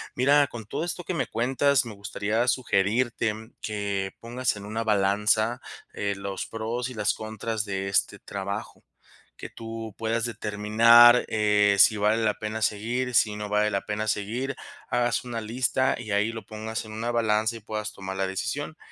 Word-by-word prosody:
Mira, 140 +2 +4
con 115 -2 -8
todo 160 +10 -3
esto 175 +1 -4
que 185 - -3
me 170 - -1
cuentas, 135 +4 +2
me 110 - -8
gustaría 105 +4 -1
sugerirte 115 -1 +1 0.3
que 100 -2 -3
pongas 120 +1 -1
en 100 -1 -9
una 110 +2 -3
balanza, 105 +3 +2 0.3
eh, 100 0 -2
los 100 -1 -5
pros 115 +3 -3
y - - -8
las 105 -3 0
contras 110 0 -3
de 95 -1 -3
este 100 - 0
trabajo, 100 +1 -6 0.5
que - - -8
tú 115 -2 -7
puedas 115 +1 -1
determinar, 115 +2 +5
eh, 105 -2 +3
si 105 +2 +6
vale 110 +2 +2
la 110 - +2
pena 110 +1 -4
seguir, 120 +5 -1
si 105 -2 +3
no 105 -1 -5
vale 105 0 +2
la 100 - 0
pena 105 +1 -3
seguir, 115 +7 -2 0.3
hagas 120 0 +1
una 120 -2 -4
lista 125 +4 0
y 110 -4 -6
ahí 105 +2 +2
lo 115 -1 -8
pongas 110 +1 -5
en 110 - -9
una 115 +2 -2
balanza 110 -1 +1
y - - -10
puedas 105 0 -5
tomar 95 0 -6
la 95 0 0
decisión. 145 - -4
110 Hz, 175 wpm, -26 LUFS, 105-120 Hz, 0.5 s, si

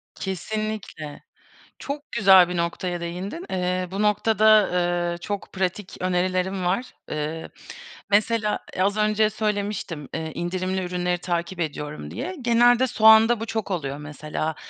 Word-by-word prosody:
Kesinlikle. 195 -5 -5 0.6
Çok 290 +1 -6
güzel 190 -5 +6
bir 180 - -3
noktaya 175 +1 -2
değindin. 185 - -5
Eee, 180 0 -1
bu 195 +2 -2
noktada, 215 0 +4
eee, 175 -1 0
çok 200 +3 -5
pratik 190 +1 -3
önerilerim 185 +1 0
var. 195 +8 -1 0.2
Eee, 155 +2 -4 0.6
mesela, 215 +1 +2 0.2
eee, - - -1
az 200 +2 +2
önce 215 0 +3
söylemiştim, 205 -8 -3
eee, 160 -1 -3
indirimli 185 +2 -2
ürünleri 180 0 -1
takip 175 0 -3
ediyorum 150 -2 -4
diye. 330 +10 -5
Genelde 240 +1 +4
soğanda 220 0 +6
bu 225 - -3
çok 220 -2 -3
oluyor. 140 -6 -2
Mesela, 150 +1 -4
185 Hz, 130 wpm, -24 LUFS, 175-215 Hz, 0.6 s, güzel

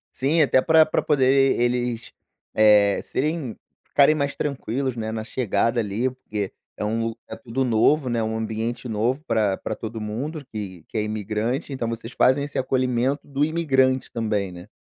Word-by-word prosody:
Sim, 150 +5 +2
até 130 -3 +4
pra 160 +1 +5
pra 155 - 0
poder 135 -2 +3
eles, 120 -1 -1 0.4
eh, 105 -2 +5
serem 150 -4 -2 0.3
ficarem 145 +2 +5
mais 140 -2 -1
tranquilos, 135 -2 -2
né, 110 -1 -3
na 110 -1 -3
chegada 115 0 0
ali. 110 +4 0
Porque 105 -6 -5 0.2
é - - -3
um 115 +1 -1 0.3
tudo 125 +2 -1
novo, 125 +4 +3
né, 120 -1 0
um 110 0 -2
ambiente 110 +3 -3
novo 120 +7 -1
pra 105 -4 +1
pra 110 - -4
todo 110 0 -6
mundo, 140 +9 -4
que 95 -6 -6
que - - -6
é 105 - +1
imigrante. 110 - -2
Então, 120 -3 -3
vocês 115 +1 -6
fazem 130 +2 +3
esse 145 - -5
acolhimento 130 +1 0
do 140 0 0
imigrante 135 -5 +1
também, 105 -4 -1
né? 90 +2 -11
120 Hz, 165 wpm, -23 LUFS, 110-135 Hz, 0.4 s, pra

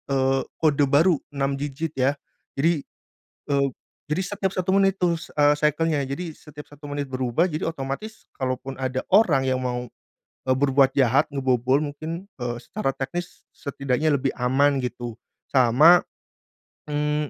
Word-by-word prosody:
eee, 135 0 +2 0.2
kode 145 -2 +4
baru 155 +3 +4 0.2
6 135 0 -1
digit 145 +2 -3
ya. 135 +3 +2 0.4
Jadi, 160 +1 +2 0.7
eee, 140 -1 +2 0.4
jadi 155 +5 0
setiap 190 -1 0
1 185 +1 0
menit 195 -1 +3
itu, 175 -2 +2
s 165 - -6
eee, 145 0 +5
cycle-nya, 150 0 +1
jadi 165 +4 -5
setiap 150 -1 -12
1 145 0 -11
menit 145 0 -3
berubah. 130 +6 +1
Jadi 155 -3 -4
otomatis 160 +8 -5
kalaupun 130 +1 -3
ada 130 0 -2
orang 165 -11 +5
yang 130 -1 0
mau, 125 -1 -2 0.6
eee, 130 -1 +2
berbuat 135 -1 +4
jahat, 135 +4 +3
ngebobol 130 -1 +1
mungkin, 160 +6 -6
eee, 120 -1 -2
secara 165 - -3
teknis 175 +6 -5
setidaknya 140 +1 -1
lebih 135 0 -1
aman 135 +2 +2
gitu. 120 -1 -5 0.4
Sama, 135 +7 +6 0.9
mmm, 150 0 -1
140 Hz, 145 wpm, -24 LUFS, 130-160 Hz, 0.9 s, Sama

